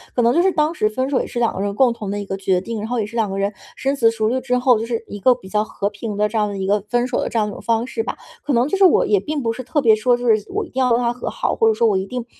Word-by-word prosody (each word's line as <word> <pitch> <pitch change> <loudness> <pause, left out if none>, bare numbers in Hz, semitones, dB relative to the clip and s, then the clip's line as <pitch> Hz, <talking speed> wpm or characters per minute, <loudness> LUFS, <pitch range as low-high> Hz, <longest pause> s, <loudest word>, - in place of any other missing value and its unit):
可 245 - +2
能 235 +1 +3
就 340 - +3
是 380 - +3
当 305 +1 +1
时 215 -10 +1
分 255 +5 -2
手 275 - +1
也 - - -3
是 240 - -4
两 235 - +1
个 - - -4
人 200 0 -2
共 255 +1 +4
同 215 -4 -6
的 205 +1 -3
一 - - -6
个 195 0 -4
决 190 -2 0
定， 225 +3 -5
然 210 - -4
后 240 0 -1
也 - - -2
是 220 +3 -8
两 220 -3 +1
个 195 - -4
人 200 +1 0 0.2
深 270 +1 -1
思 230 - +4
熟 220 -1 0
虑 255 +2 0
之 250 -1 0
后， 250 -2 +3
就 225 - -3
是 230 -1 -3
一 205 - -7
个 250 +5 +4
比 215 -6 -13
较 210 +1 0
和 200 -2 -3
平 210 +1 -6
的 210 +1 +1
这 225 - -3
样 210 -1 +2
的 200 -1 -5
一 190 - -3
个 205 +2 +2
分 240 +2 +1
手 255 - -2
的 - - -1
这 - - -3
样 210 -1 +1
一 - - -6
种 - - -9
方 230 0 0
式 355 - -3
吧， - - -5 0.3
可 290 - 0
能 245 +3 +2
就 390 - 0
是 385 - +6
我 360 - +4
也 205 - +3
并 295 +8 -3
不 230 - 0
是 230 - -6
特 255 +4 -1
别 230 -4 +5
说 230 +3 +2
就 245 0 -6
是 215 -3 +3
我 420 +2 -2
一 - - -15
定 260 - -4
要 255 - +3
跟 230 - +4
他 240 -1 +1
和 245 - -5
好， - - -2
或 450 - +2
者 445 - +4
说 235 - +1
我 205 -3 +2
一 190 - -2
定 245 +3 -5
230 Hz, 410 characters per minute, -20 LUFS, 210-255 Hz, 0.3 s, 是